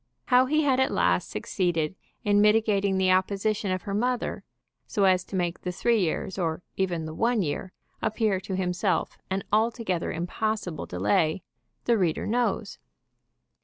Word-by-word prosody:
How 255 +1 +5
he 305 +3 +2
had 265 -3 +3
at 265 - +3
last - - +1
succeeded 175 -3 -1 0.3
in 205 0 +4
mitigating 210 -2 +3
the 190 -1 +3
opposition 200 +2 +1
of 185 -1 -2
her 200 - -4
mother, 245 +4 -1 0.4
so 205 - 0
as 185 -1 +4
to - - -7
make 175 -2 -1
the 180 - -3
three 230 +5 +2
years, 190 +1 -1
or 165 0 -1
even 175 -4 -1
the 155 - -6
one 230 +3 +1
year, 165 +4 -3 0.3
appear 215 -3 +1
to 190 0 -5
himself 180 0 -1
an 195 +1 -1
altogether 220 -5 +1
impossible 180 +1 -3
delay, 105 - +1 0.4
the 235 -2 +3
reader 170 -4 0
knows. 225 -2 -1
195 Hz, 155 wpm, -27 LUFS, 180-220 Hz, 0.4 s, How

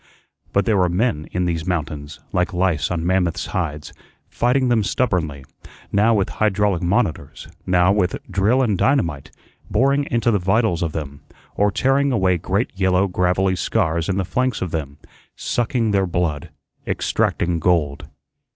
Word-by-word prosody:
But 100 - +1
there 110 -3 +2
were 90 -2 +3
men 90 -4 0
in 90 0 -1
these 85 -1 -2
mountains, 75 -4 -3
like 90 +1 0
lice 85 -4 +1
on 85 -2 -2
mammoths' 90 -2 0
hides, 80 -6 -4 0.3
fighting 125 +2 +1
them 120 -3 +2
stubbornly, 85 - -1 0.5
now 105 +3 +3
with 100 -2 +1
hydraulic 105 -4 +1
"monitors," 85 - -1 0.2
now 90 0 +4
with 100 -3 +1
drill 110 +7 +2
and 110 -5 +1
dynamite, 85 - +1 0.4
boring 140 +5 +2
into 120 0 +1
the 105 - +2
vitals 95 -1 +1
of 80 -3 -2
them, 70 -3 -6 0.3
or 105 0 +3
tearing 135 +6 +1
away 95 -6 +2
great 95 +7 -1
yellow 95 0 +2
gravelly 90 +1 +1
scars 80 -1 0
in 95 - 0
the 95 - 0
flanks 130 +5 -1
of 90 - -4
them, 70 -4 -4 0.4
sucking 120 -2 -1
their 95 -2 +2
blood, 85 -4 -2 0.4
extracting 85 -1 0
gold. 75 -4 0
95 Hz, 150 wpm, -21 LUFS, 85-105 Hz, 0.5 s, now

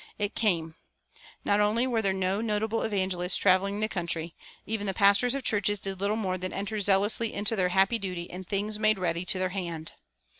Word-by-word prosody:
It 205 -1 -2
came. 170 -7 +1 0.7
Not 205 0 +2
only 215 +4 +2
were 240 -3 0
there 195 -2 +2
no 190 +2 -1
notable 220 0 -1
evangelists 185 -3 +1
traveling 200 +2 +2
the 215 - +2
country; 170 -4 -4 0.3
even 210 -1 -3
the 195 - -2
pastors 200 +6 +4
of 275 - -4
churches 205 -1 +1
did 195 -1 -4
little 205 +2 +1
more 185 -4 -2
than 185 +1 -4
enter 205 +2 -3
zealously 205 +3 +2
into 205 +2 -1
their 185 -3 +1
happy 195 +5 +2
duty 180 -4 -4
in 180 +2 -8
things 205 +3 -2
made 215 -1 +3
ready 175 -1 -2
to 185 - +2
their 185 0 0
hand. 170 -4 -5
200 Hz, 195 wpm, -28 LUFS, 185-215 Hz, 0.7 s, pastors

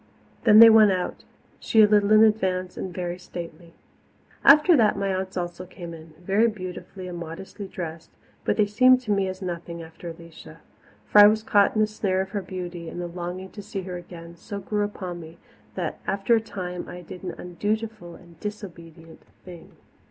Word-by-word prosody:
Then 215 -2 +7
they 230 +1 +11
went 215 -2 +7
out, 185 -1 -3 0.3
she 220 -1 +4
a - - +7
little 205 0 +3
in 215 0 +7
advance 185 -4 +1
and 185 - -5
very 175 0 -4
stately. 170 -1 -9 0.7
After 300 +5 +7
that 220 -6 +3
my 195 -1 -1
aunts 190 0 -4
also 175 +1 -5
came 175 -2 -9
in, 160 -1 -13
very 195 +6 +2
beautifully 185 -2 -7
and 175 -1 -6
modestly 185 +4 -8
dressed, 165 -3 -7 0.3
but - - 0
they 210 - +4
seemed 255 +5 +5
to 225 -4 -4
me 195 -1 +1
as 185 +1 -6
nothing 170 -1 -6
after 165 +1 -10
Alicia. 165 -1 -13 0.4
For 210 - +5
I 205 - +11
was 215 +1 +2
caught 205 -1 +3
in 215 - +2
the - - +5
snare 200 -3 -1
of 190 0 -6
her 205 - -2
beauty, 175 -2 -7
and 175 - -7
the 175 - -3
longing 180 +2 -6
to 205 - -9
see 200 -1 -6
her 180 -1 -6
again 170 -1 -10
so 200 +4 -7
grew 210 +1 -2
upon 185 -4 -5
me 165 0 -12 0.4
that - - -4
after 195 +4 +1
a 225 - +1
time 180 -5 -6
I 180 - -8
did 175 +1 -10
an 180 -2 -6
undutiful 205 0 -4
and 170 -3 -18
disobedient 170 -6 -9 0.2
thing. 175 -3 -12
185 Hz, 195 wpm, -25 LUFS, 175-210 Hz, 0.7 s, they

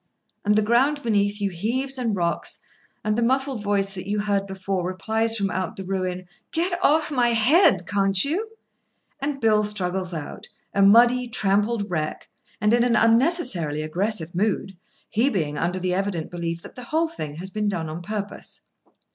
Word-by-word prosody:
and 210 0 +3
the 215 - +3
ground 265 +7 +2
beneath 205 -2 +1
you 200 -1 -1
heaves 255 +9 -2
and 230 -4 0
rocks, 170 -2 -1 0.5
and 210 0 +1
the 235 - 0
muffled 265 0 0
voice 200 -1 0
that 190 0 -7
you 210 0 0
heard 200 -1 0
before 190 -1 -3
replies 220 +5 0
from 200 -2 -1
out 185 -2 -3
the 195 - -6
ruin: 185 -1 -3 0.2
"Get 350 +2 -1
off 310 +2 +3
my 250 -4 +3
head, 230 - +4
can't 195 +1 +2
you?" 380 +10 -2 0.7
And 280 0 -2
Bill 215 -2 +3
struggles 190 -3 -1
out, 155 -4 -6 0.3
a 200 - +2
muddy, 240 +5 +6
trampled 205 -1 +1
wreck, 155 -3 -3 0.3
and 210 +2 +3
in 240 0 +4
an 240 -1 +2
unnecessarily 225 - +2
aggressive 175 +1 -2
mood—he 200 +4 -2
being 155 - -2
under 175 +2 -1
the 185 0 -1
evident 190 -4 -2
belief 170 -1 -4
that - - -11
the 250 - -9
whole 320 +5 +1
thing 155 - -6
has 185 +4 -5
been 210 +1 -1
done 175 -5 -2
on 155 +2 -6
purpose. 205 +2 -6
205 Hz, 170 wpm, -24 LUFS, 185-235 Hz, 0.7 s, muddy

